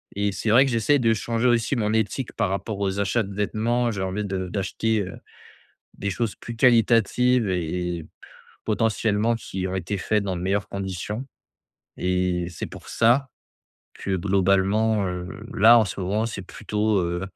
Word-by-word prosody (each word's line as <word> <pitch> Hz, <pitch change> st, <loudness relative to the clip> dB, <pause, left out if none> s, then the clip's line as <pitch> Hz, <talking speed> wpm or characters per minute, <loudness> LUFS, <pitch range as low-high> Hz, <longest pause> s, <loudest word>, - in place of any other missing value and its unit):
et 100 Hz, 0 st, 0 dB
c'est 110 Hz, +3 st, -1 dB
vrai 125 Hz, +4 st, +7 dB
que 135 Hz, -, 0 dB
j'essaie 115 Hz, +5 st, +3 dB
de 115 Hz, -2 st, +3 dB
changer 115 Hz, +3 st, 0 dB
aussi 120 Hz, +2 st, +2 dB
mon 105 Hz, -3 st, 0 dB
éthique 110 Hz, +3 st, -1 dB
par 105 Hz, -4 st, 0 dB
rapport 100 Hz, +2 st, -3 dB
aux 100 Hz, 0 st, -1 dB
achats 100 Hz, +4 st, +1 dB
de 100 Hz, 0 st, -8 dB
vêtements. 115 Hz, +4 st, 0 dB
J'ai 95 Hz, -3 st, -3 dB
envie 95 Hz, +3 st, -2 dB
de 95 Hz, -2 st, -3 dB
d'acheter, 105 Hz, +4 st, -1 dB
heu, 95 Hz, -1 st, -6 dB, 0.8 s
des 100 Hz, -, -2 dB
choses 110 Hz, +2 st, -2 dB
plus 120 Hz, -, -8 dB
qualitatives 120 Hz, 0 st, +3 dB
et 90 Hz, 0 st, -2 dB
et 80 Hz, -, -9 dB, 0.6 s
potentiellement 110 Hz, 0 st, +1 dB
qui 95 Hz, -4 st, -4 dB
ont 95 Hz, -, -3 dB
été 95 Hz, +2 st, -3 dB
faites 105 Hz, +2 st, 0 dB
dans 95 Hz, -2 st, -2 dB
de 85 Hz, -, -5 dB
meilleures 100 Hz, +2 st, 0 dB
conditions 100 Hz, +5 st, -4 dB, 0.7 s
et 90 Hz, -1 st, 0 dB
c'est 85 Hz, -, -6 dB
pour -, -, -12 dB
ça, 125 Hz, +4 st, +3 dB, 0.7 s
que, 95 Hz, -, -3 dB
globalement, 100 Hz, +3 st, +2 dB
heu, 90 Hz, 0 st, -4 dB, 0.3 s
là, 115 Hz, +4 st, +7 dB
en 110 Hz, -, +4 dB
ce 100 Hz, -, -5 dB
moment, 100 Hz, +4 st, 0 dB
c'est 110 Hz, -3 st, -5 dB
plutôt, 105 Hz, +3 st, -1 dB
heu, 85 Hz, 0 st, -2 dB
105 Hz, 175 wpm, -24 LUFS, 95-115 Hz, 0.8 s, vrai